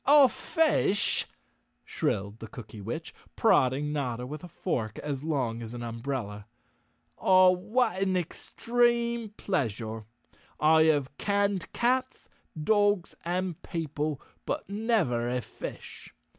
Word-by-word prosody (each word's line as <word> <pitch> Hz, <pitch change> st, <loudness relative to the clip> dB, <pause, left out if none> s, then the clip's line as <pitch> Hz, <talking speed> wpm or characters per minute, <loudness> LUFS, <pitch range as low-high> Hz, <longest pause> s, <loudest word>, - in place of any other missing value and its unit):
"A 285 Hz, -1 st, +9 dB
fish!" 300 Hz, -12 st, +2 dB, 0.6 s
shrilled 100 Hz, +3 st, -2 dB
the 115 Hz, -, -7 dB
Cookywitch, 115 Hz, +7 st, -7 dB, 0.2 s
prodding 145 Hz, -, +3 dB
Notta 125 Hz, -4 st, -2 dB
with 150 Hz, +5 st, -7 dB
a -, -, -7 dB
fork 110 Hz, -9 st, -3 dB
as 145 Hz, -2 st, -4 dB
long 130 Hz, -7 st, -1 dB
as 115 Hz, +1 st, -7 dB
an 120 Hz, -, -5 dB
umbrella. 115 Hz, -3 st, -4 dB, 0.7 s
"Ah, 185 Hz, -1 st, +6 dB
what 210 Hz, +2 st, 0 dB
an 190 Hz, -1 st, +2 dB
extreme 235 Hz, +5 st, 0 dB
pleasure. 115 Hz, -, -2 dB, 0.5 s
I 160 Hz, +1 st, +5 dB
have 145 Hz, -3 st, +2 dB
canned 200 Hz, -2 st, 0 dB
cats, 255 Hz, +2 st, 0 dB, 0.4 s
dogs 205 Hz, -2 st, +2 dB
and 180 Hz, -1 st, -2 dB
people, 150 Hz, -3 st, -3 dB, 0.3 s
but -, -, -2 dB
never 200 Hz, -, +1 dB
a 125 Hz, +1 st, 0 dB
fish. -, -, -8 dB
155 Hz, 115 wpm, -28 LUFS, 125-205 Hz, 0.7 s, A